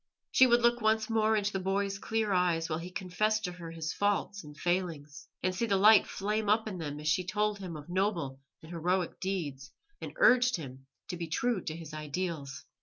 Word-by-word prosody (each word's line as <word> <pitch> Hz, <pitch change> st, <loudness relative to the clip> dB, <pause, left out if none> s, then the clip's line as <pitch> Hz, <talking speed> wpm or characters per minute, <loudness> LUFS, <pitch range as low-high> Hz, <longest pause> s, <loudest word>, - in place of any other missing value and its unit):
She 260 Hz, -, +6 dB
would 240 Hz, -1 st, +4 dB
look 240 Hz, 0 st, +3 dB
once 220 Hz, +1 st, +1 dB
more 220 Hz, 0 st, +3 dB
into 210 Hz, -1 st, 0 dB
the 190 Hz, -, -1 dB
boy's 195 Hz, +1 st, -1 dB
clear 220 Hz, -2 st, -1 dB
eyes 175 Hz, -3 st, +1 dB
while 155 Hz, 0 st, -2 dB
he 175 Hz, +2 st, -7 dB
confessed 215 Hz, +4 st, -1 dB
to 180 Hz, -, -2 dB
her 175 Hz, -2 st, -9 dB
his 165 Hz, -1 st, -4 dB
faults 205 Hz, 0 st, -1 dB
and 150 Hz, 0 st, -12 dB
failings, 165 Hz, -3 st, -2 dB, 0.2 s
and 185 Hz, -, +1 dB
see 230 Hz, +5 st, -1 dB
the 200 Hz, -2 st, +2 dB
light 210 Hz, +2 st, +7 dB
flame 210 Hz, +1 st, -2 dB
up 220 Hz, +1 st, +3 dB
in 190 Hz, -4 st, -5 dB
them 150 Hz, -2 st, -5 dB
as 150 Hz, -, -6 dB
she 165 Hz, +4 st, +2 dB
told 210 Hz, +2 st, -1 dB
him 180 Hz, -4 st, -6 dB
of 150 Hz, -, -11 dB
noble 175 Hz, -8 st, -1 dB, 0.2 s
and 160 Hz, -, -11 dB
heroic 175 Hz, +1 st, -1 dB
deeds, 145 Hz, -9 st, -4 dB, 0.3 s
and -, -, -6 dB
urged 250 Hz, -, +5 dB
him 135 Hz, -5 st, -9 dB, 0.2 s
to 175 Hz, -, -4 dB
be 170 Hz, -1 st, -4 dB
true 220 Hz, +4 st, 0 dB
to 155 Hz, -, -3 dB
his 165 Hz, -2 st, -9 dB
ideals. 155 Hz, -2 st, -4 dB
185 Hz, 210 wpm, -30 LUFS, 165-210 Hz, 0.3 s, light